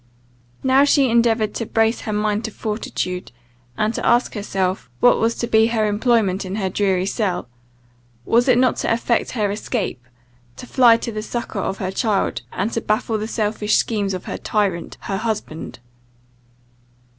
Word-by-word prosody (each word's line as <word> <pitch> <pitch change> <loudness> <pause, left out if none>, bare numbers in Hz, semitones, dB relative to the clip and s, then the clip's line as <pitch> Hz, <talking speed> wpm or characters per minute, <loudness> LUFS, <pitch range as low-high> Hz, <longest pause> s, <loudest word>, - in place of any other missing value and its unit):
Now 265 +1 +5
she 280 -3 +3
endeavoured 225 -2 +2
to 230 - -3
brace 225 +1 +1
her 215 - -4
mind 210 +1 0
to 220 - -4
fortitude, 195 -4 -4 0.5
and 215 +1 +1
to - - -4
ask 240 +1 +3
herself 195 -2 -2
what 245 - +5
was 230 +1 +1
to - - -2
be 220 -1 +4
her 225 -2 +1
employment 210 -2 +1
in 190 +1 -5
her 195 -3 -1
dreary 190 -2 +1
cell? 195 - -1 0.8
Was 240 +2 +3
it 250 -2 +5
not 255 -1 +3
to - - -1
effect 235 +1 0
her 210 -5 0
escape, 205 - -3 0.5
to - - -9
fly 240 -2 +5
to 230 - -5
the 215 -1 -4
succour 225 -2 -4
of 190 - -2
her 185 0 -3
child, 205 0 0
and 205 +5 -2
to 230 - -1
baffle 215 +1 0
the 215 - -3
selfish 210 -1 0
schemes 200 -4 0
of 185 - -7
her - - -5
tyrant 195 -6 -1
her 195 - -3
husband? 215 -7 -4
215 Hz, 170 wpm, -21 LUFS, 200-230 Hz, 0.8 s, Now